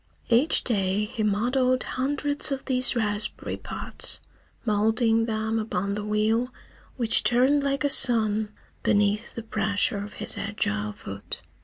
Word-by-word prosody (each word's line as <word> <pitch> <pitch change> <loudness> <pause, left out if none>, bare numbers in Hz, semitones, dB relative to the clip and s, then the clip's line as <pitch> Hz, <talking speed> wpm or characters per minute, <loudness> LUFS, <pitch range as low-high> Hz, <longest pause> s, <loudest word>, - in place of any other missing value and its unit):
Each 245 +7 +3
day 200 -2 0
he 225 +1 -5
modelled 250 +5 +1
hundreds 285 +2 0
of 270 -1 -3
these 255 -1 +1
raspberry 210 -2 -1
pots, - - -1 0.5
moulding 225 +1 +2
them 220 0 -1
upon 200 -2 -2
the 210 0 -3
wheel 215 +4 0 0.5
which 230 -3 +2
turned 260 +4 +3
like 275 +1 -1
a 285 - +2
sun 220 -5 +4 0.3
beneath 210 +2 +1
the 230 - -5
pressure 210 -2 0
of 210 - -9
his - - -1
agile 105 - -2
foot. 100 0 -7
220 Hz, 135 wpm, -25 LUFS, 210-250 Hz, 0.5 s, sun